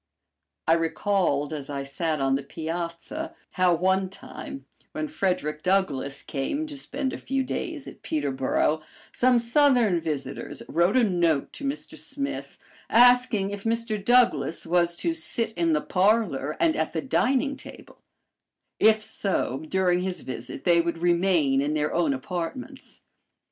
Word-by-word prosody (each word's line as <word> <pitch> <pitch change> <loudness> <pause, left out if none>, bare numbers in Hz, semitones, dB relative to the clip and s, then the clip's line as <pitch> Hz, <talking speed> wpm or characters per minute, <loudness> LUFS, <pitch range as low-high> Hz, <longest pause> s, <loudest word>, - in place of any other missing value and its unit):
I 160 - +6
recalled 165 -3 +1
as 145 -2 -6
I 140 -1 -3
sat 155 +3 -2
on 135 0 +2
the 135 - +1
piazza 170 - -5 0.2
how 185 -2 +3
one 190 +2 +1
time, 275 +7 -9 0.3
when 310 +1 -2
Frederick 180 - -1
Douglass 155 -8 0
came 220 - -2
to 300 -2 -7
spend 270 -1 -3
a - - -5
few 270 0 -1
days 300 +2 -4
at - - -11
Peterboro, 145 +1 0 0.3
some 250 0 +4
Southern 235 - +3
visitors 145 -4 -4
wrote 175 +8 +2
a 250 - +5
note 170 -8 +1
to - - -9
Mr. 300 +3 -4
Smith 280 0 -5 0.3
asking 245 -4 +5
if 205 -1 -6
Mr. 225 -2 -1
Douglass 230 - +3
was 170 0 +2
to 335 - -1
sit 240 -9 -3
in 170 -3 +1
the 150 - +2
parlor 185 -7 +1
and 325 -2 +3
at - - -1
the - - -1
dining 275 +1 +1
table; - - -13 0.8
if 215 0 +5
so, 195 - -2
during 185 -2 +2
his 185 0 -3
visit 130 +1 -7
they 170 -1 +5
would 170 0 -2
remain 170 -5 +2
in 150 +2 -1
their 150 0 0
own 165 -4 +2
apartments. 180 - -6
180 Hz, 150 wpm, -26 LUFS, 155-245 Hz, 0.8 s, I